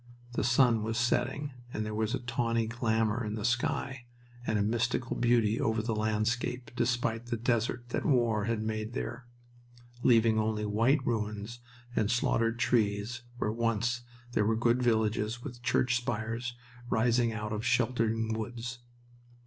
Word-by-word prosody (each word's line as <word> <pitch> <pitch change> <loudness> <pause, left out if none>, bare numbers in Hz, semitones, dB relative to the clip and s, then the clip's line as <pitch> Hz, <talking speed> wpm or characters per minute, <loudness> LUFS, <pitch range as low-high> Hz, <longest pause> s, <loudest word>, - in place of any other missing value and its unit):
The - - 0
sun 120 -1 +4
was 110 +1 -2
setting 125 +4 0 0.2
and 110 - -2
there 110 - -4
was 110 +3 0
a - - -3
tawny 115 -1 0
glamour 115 0 0
in 105 0 -3
the 105 -1 -3
sky, 120 +1 -1 0.4
and 110 - +2
a 100 - +2
mystical 120 +3 0
beauty 115 -2 +2
over 110 -1 +1
the 115 0 -1
landscape 110 +3 -1
despite 120 -1 0
the 120 -1 -1
desert 120 +1 0
that - - -1
war 120 -8 +2
had 115 -1 -1
made 110 +1 -3
there, 120 +1 -5 0.7
leaving 115 -2 +4
only 110 -1 0
white 115 +7 +2
ruins 110 0 -2 0.4
and 105 -2 +2
slaughtered 115 -1 +1
trees 115 -1 +1 0.2
where 105 - 0
once 115 +1 0 0.3
there 110 - +2
were 110 +2 +2
good 120 +2 +2
villages 110 0 +1
with 120 -4 -8
church 120 0 +2
spires 120 0 -3 0.3
rising 115 +1 +3
out 105 -1 -4
of 105 +1 -3
sheltering 115 -2 +1
woods. 120 +2 -5
115 Hz, 150 wpm, -30 LUFS, 110-120 Hz, 0.7 s, sun